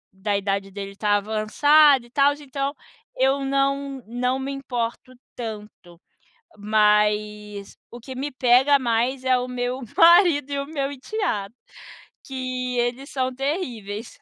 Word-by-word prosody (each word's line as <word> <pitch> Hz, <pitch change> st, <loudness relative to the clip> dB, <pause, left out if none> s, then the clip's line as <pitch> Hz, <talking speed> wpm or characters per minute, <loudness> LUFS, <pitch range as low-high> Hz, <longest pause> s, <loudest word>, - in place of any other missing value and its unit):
da 200 Hz, +1 st, -1 dB
idade 195 Hz, 0 st, -2 dB
dele 195 Hz, 0 st, -7 dB
estar 205 Hz, 0 st, +1 dB
avançada 250 Hz, +6 st, +4 dB
e -, -, -19 dB
tal, 285 Hz, +1 st, +3 dB
então, 280 Hz, -1 st, -4 dB, 0.4 s
eu 270 Hz, +1 st, +2 dB
não 275 Hz, 0 st, -1 dB
não 250 Hz, +2 st, -1 dB
me 270 Hz, +1 st, -4 dB
importo 250 Hz, -2 st, -4 dB, 0.2 s
tanto. 210 Hz, -6 st, -9 dB, 0.6 s
Mas 210 Hz, -1 st, 0 dB, 0.2 s
o 240 Hz, -, -9 dB
que 260 Hz, +2 st, -9 dB
me 280 Hz, +1 st, -4 dB
pega 260 Hz, +3 st, +4 dB
mais 245 Hz, +2 st, 0 dB
é 255 Hz, -1 st, +3 dB
o 250 Hz, -, -3 dB
meu 250 Hz, +1 st, -3 dB, 0.2 s
marido 335 Hz, -4 st, +5 dB
e 280 Hz, -, -1 dB
o 280 Hz, -, -3 dB
meu 280 Hz, -3 st, -3 dB
enteado, 265 Hz, -, -3 dB, 0.7 s
que 255 Hz, -1 st, -4 dB
eles 245 Hz, +4 st, -2 dB
são 260 Hz, -2 st, -1 dB
terríveis. 245 Hz, -, -4 dB
250 Hz, 135 wpm, -23 LUFS, 215-275 Hz, 0.7 s, marido